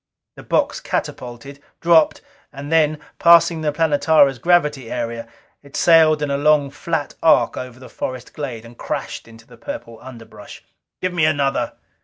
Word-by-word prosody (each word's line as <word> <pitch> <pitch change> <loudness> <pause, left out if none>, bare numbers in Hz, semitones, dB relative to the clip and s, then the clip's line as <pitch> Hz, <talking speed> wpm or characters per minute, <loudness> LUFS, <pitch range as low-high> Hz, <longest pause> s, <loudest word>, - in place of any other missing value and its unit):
The - - -11
box - - 0
catapulted, 125 +3 -6 0.2
dropped; 165 -2 +3 0.3
and 145 +2 -9
then 155 -2 +3 0.2
passing 170 -1 +5
the 150 -1 0
Planetara's 145 -3 +2
gravity 150 -6 +1
area, 115 -1 -4 0.3
it 140 -1 -15
sailed 160 -3 +4
in 145 - -2
a 140 - 0
long 145 -1 +2
flat 160 -1 -4
arc 125 -7 +3
over 125 -1 -8
the 130 - -12
forest 130 0 -7
glade 125 -6 -6
and 115 +1 -14
crashed - - -5
into 115 0 -16
the - - -17
purple 285 - -8
underbrush. 115 -5 -12 0.4
"Give 185 0 -1
me 170 -3 +2
another!" 140 -3 0
145 Hz, 155 wpm, -20 LUFS, 125-160 Hz, 0.4 s, passing